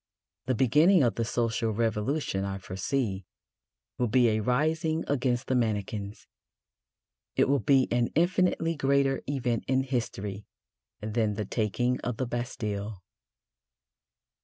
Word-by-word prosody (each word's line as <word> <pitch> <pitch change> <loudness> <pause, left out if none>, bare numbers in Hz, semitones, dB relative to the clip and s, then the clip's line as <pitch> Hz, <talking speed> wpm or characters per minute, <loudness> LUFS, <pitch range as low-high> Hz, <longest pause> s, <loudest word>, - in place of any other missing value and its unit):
The 130 - +1
beginning 150 - +5
of 120 - +2
the 115 - -1
social 115 -1 0
revolution, 110 0 -1
I 100 0 -3
foresee, 95 +2 -2 0.8
will 125 - +2
be 120 +1 +4
a 110 0 +1
rising 155 - 0
against 125 -2 0
the - - -1
mannequins. 105 -3 -2 1.1
It - - +3
will 140 +1 +3
be 130 +4 +3
an 120 0 +2
infinitely 175 -1 +2
greater 140 -1 +2
event 125 -4 -1
in 130 0 +2
history 105 -6 -4 0.5
than 110 0 0
the 105 0 -3
taking 120 +4 0
of 120 -2 -4
the 130 - -1
Bastille. 110 -5 -4
120 Hz, 125 wpm, -28 LUFS, 105-135 Hz, 1.1 s, beginning